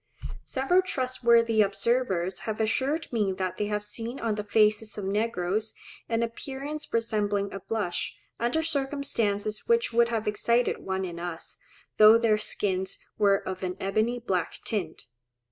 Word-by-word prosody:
Several 275 Hz, +8 st, +2 dB
trustworthy 235 Hz, -7 st, +2 dB
observers 195 Hz, -3 st, +1 dB
have 215 Hz, -, -3 dB
assured 270 Hz, +8 st, 0 dB
me 210 Hz, -4 st, +1 dB
that 185 Hz, -1 st, -3 dB
they 210 Hz, -, -1 dB
have 210 Hz, 0 st, -2 dB
seen 230 Hz, +5 st, -5 dB
on 230 Hz, -2 st, 0 dB
the 210 Hz, 0 st, -3 dB
faces 215 Hz, 0 st, +2 dB
of 205 Hz, -, -4 dB
negroes 210 Hz, 0 st, -1 dB, 0.3 s
an 230 Hz, 0 st, +1 dB
appearance 275 Hz, +6 st, -5 dB
resembling 205 Hz, -3 st, 0 dB
a 195 Hz, -, -4 dB
blush, 205 Hz, -3 st, -3 dB, 0.2 s
under 240 Hz, +7 st, +1 dB
circumstances 270 Hz, -9 st, -1 dB
which 465 Hz, -, +2 dB
would 235 Hz, 0 st, +5 dB
have 225 Hz, -2 st, -2 dB
excited 235 Hz, +3 st, +1 dB
one 190 Hz, 0 st, -2 dB
in 170 Hz, -2 st, -6 dB
us, 170 Hz, -1 st, -6 dB, 0.4 s
though 215 Hz, +1 st, +9 dB
their 225 Hz, -2 st, +2 dB
skins 190 Hz, -2 st, -1 dB, 0.2 s
were 200 Hz, -2 st, +3 dB
of 185 Hz, 0 st, -4 dB
an 180 Hz, 0 st, -3 dB
ebony 215 Hz, +5 st, 0 dB
black 190 Hz, -8 st, -2 dB
tint. 185 Hz, -8 st, -3 dB
215 Hz, 145 wpm, -27 LUFS, 195-235 Hz, 0.4 s, though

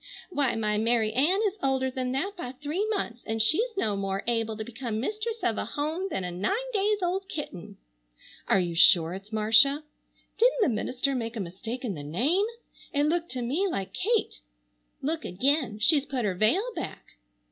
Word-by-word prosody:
Why, 285 Hz, -7 st, +1 dB
my 210 Hz, -1 st, 0 dB
Mary 225 Hz, -1 st, +2 dB
Ann 330 Hz, -, +3 dB
is 410 Hz, 0 st, -1 dB
older 265 Hz, -1 st, +1 dB
than 255 Hz, -1 st, -2 dB
that 360 Hz, +10 st, -1 dB
by 255 Hz, -8 st, -6 dB
three 300 Hz, +10 st, -2 dB
months, 245 Hz, -, -2 dB
and 225 Hz, 0 st, -3 dB
she's 405 Hz, -, +2 dB
no 215 Hz, -, +1 dB
more 195 Hz, 0 st, -2 dB
able 225 Hz, -2 st, -1 dB
to 220 Hz, -, -3 dB
become 230 Hz, -1 st, -4 dB
mistress 430 Hz, -, -3 dB
of 225 Hz, -, +1 dB
a -, -, -2 dB
home 310 Hz, -, -2 dB
than 190 Hz, -, -2 dB
a 180 Hz, -, -3 dB
nine 405 Hz, -, -2 dB
days 410 Hz, -1 st, +1 dB
old 375 Hz, +2 st, -1 dB
kitten. 195 Hz, -, -6 dB, 0.7 s
Are 195 Hz, -, +4 dB
you 175 Hz, -2 st, -1 dB
sure 165 Hz, 0 st, +5 dB
it's 195 Hz, +3 st, -9 dB
Marcia? 225 Hz, +7 st, +5 dB, 0.6 s
Didn't -, -, +4 dB
the -, -, +3 dB
minister 250 Hz, +4 st, -1 dB
make 230 Hz, -2 st, -3 dB
a -, -, -4 dB
mistake 215 Hz, +8 st, -5 dB
in 215 Hz, -, -2 dB
the 150 Hz, -, -7 dB
name? 270 Hz, -, +1 dB, 0.4 s
It 285 Hz, -2 st, +1 dB
looked 335 Hz, +3 st, 0 dB
to 250 Hz, -2 st, -3 dB
me 305 Hz, +12 st, 0 dB
like 195 Hz, -, -4 dB
Kate. 450 Hz, +3 st, 0 dB, 0.6 s
Look 315 Hz, +3 st, -1 dB
again. 255 Hz, -, +1 dB
She's 280 Hz, +6 st, +3 dB
put 255 Hz, -4 st, -2 dB
her 195 Hz, -, +1 dB
veil 215 Hz, -, +2 dB
back. -, -, -6 dB
255 Hz, 190 wpm, -27 LUFS, 215-345 Hz, 0.7 s, sure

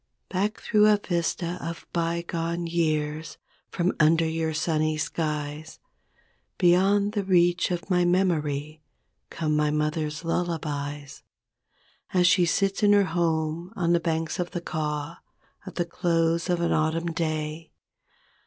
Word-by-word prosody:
Back 205 Hz, +4 st, -1 dB
through 210 Hz, -1 st, +3 dB
a 210 Hz, -1 st, +5 dB
vista 175 Hz, -1 st, -2 dB
of 165 Hz, 0 st, -6 dB
bygone 170 Hz, 0 st, -2 dB
years. 155 Hz, -2 st, -1 dB, 0.3 s
From 175 Hz, +2 st, 0 dB
under 165 Hz, +1 st, +4 dB
your 160 Hz, 0 st, -1 dB
sunny 155 Hz, -1 st, 0 dB
skies, 150 Hz, 0 st, -3 dB, 0.8 s
Beyond 195 Hz, +3 st, +3 dB
the 205 Hz, -2 st, -1 dB
reach 175 Hz, -1 st, +3 dB
of 175 Hz, +1 st, -3 dB
my 180 Hz, -2 st, +2 dB
memory 155 Hz, -5 st, 0 dB, 0.5 s
Come 155 Hz, -2 st, -1 dB
my 150 Hz, 0 st, +2 dB
mother's 150 Hz, +1 st, -1 dB
lullabies. 145 Hz, -5 st, -3 dB, 0.9 s
As 180 Hz, -1 st, +4 dB
she 180 Hz, -1 st, +4 dB
sits 195 Hz, +3 st, +1 dB
in 205 Hz, -1 st, +5 dB
her 205 Hz, -1 st, +5 dB
home 165 Hz, 0 st, -1 dB
on 170 Hz, -1 st, +1 dB
the 170 Hz, -, +4 dB
banks 165 Hz, +1 st, -2 dB
of 175 Hz, 0 st, -1 dB
the 175 Hz, -, -4 dB
Kaw 150 Hz, -3 st, -3 dB, 0.5 s
At -, -, -8 dB
the 175 Hz, -, 0 dB
close 170 Hz, 0 st, 0 dB
of 175 Hz, -1 st, +1 dB
an 170 Hz, -, +1 dB
autumn 165 Hz, +2 st, 0 dB
day. 155 Hz, 0 st, -3 dB
165 Hz, 135 wpm, -26 LUFS, 155-175 Hz, 0.9 s, a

